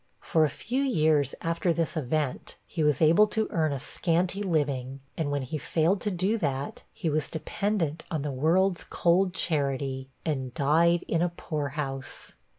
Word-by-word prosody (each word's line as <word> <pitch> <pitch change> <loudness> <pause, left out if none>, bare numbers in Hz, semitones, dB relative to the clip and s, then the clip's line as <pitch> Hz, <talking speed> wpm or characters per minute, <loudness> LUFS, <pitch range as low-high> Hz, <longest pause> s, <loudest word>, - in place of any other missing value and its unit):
For 160 - +2
a 155 - +3
few 250 - -2
years 155 - +2
after 170 +1 0
this 165 0 0
event, 150 -2 -2
he 165 - -4
was 150 0 +3
able 170 +7 +6
to 220 +1 -1
earn 155 -2 +1
a 140 - -2
scanty 180 +7 0
living, 140 -7 -1 0.2
and 160 -3 -1
when 145 -1 -1
he 150 +4 -4
failed 165 +4 +1
to 210 - 0
do 195 +4 0
that, 140 -4 -2
he - - -4
was 155 -1 0
dependent 165 -1 -2
on 155 -4 -2
the 145 - -2
'world's 170 +7 +2
cold 180 +2 +2
charity,' 135 -4 -1 0.2
and 130 -5 -2
died 165 +5 +3
in 165 - +1
a 175 - +2
poorhouse. 145 -5 -4
160 Hz, 165 wpm, -28 LUFS, 140-175 Hz, 0.2 s, able